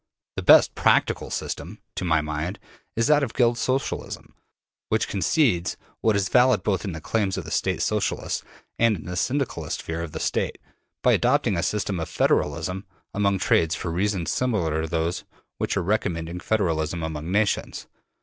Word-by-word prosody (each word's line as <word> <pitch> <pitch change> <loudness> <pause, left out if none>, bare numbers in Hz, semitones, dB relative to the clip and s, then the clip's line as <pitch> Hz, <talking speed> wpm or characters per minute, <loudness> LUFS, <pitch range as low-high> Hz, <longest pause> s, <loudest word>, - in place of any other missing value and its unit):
The - - -2
BEST - - +7
practicable - - +2
system, - - -4 0.2
to - - -3
my 80 -3 +2
mind, 75 +4 -3 0.4
is 115 - +2
that 150 +2 +5
of 130 -5 -3
Guild 120 -1 +3
Socialism, 130 +3 -2 0.6
which - - +1
concedes 100 - +1 0.2
what 110 -2 +2
is 100 -1 +1
valid 125 -2 +4
both 95 -4 0
in 95 - -3
the 80 - -5
claims 100 +3 -1
of - - -4
the - - -8
State - - 0
Socialists - - -1 0.4
and 115 -2 +4
in 80 - -11
the 90 - -5
Syndicalist 135 - -1
fear 80 0 -4
of 85 -2 -5
the 80 - -5
State, - - -1 0.5
by - - +5
adopting 125 -4 +2
a 85 - 0
system 100 -1 -1
of 80 - -4
federalism 85 +6 0 0.3
among 100 -1 +2
trades 80 -3 +2
for 85 - -4
reasons 95 0 0
similar 90 -11 0
to 80 - -3
those 85 +2 -1 0.4
which - - -1
are 95 - 0
recommending 90 -4 -1
federalism 85 -6 0
among 80 +1 -4
nations. 105 +1 0
95 Hz, 170 wpm, -25 LUFS, 80-110 Hz, 0.6 s, BEST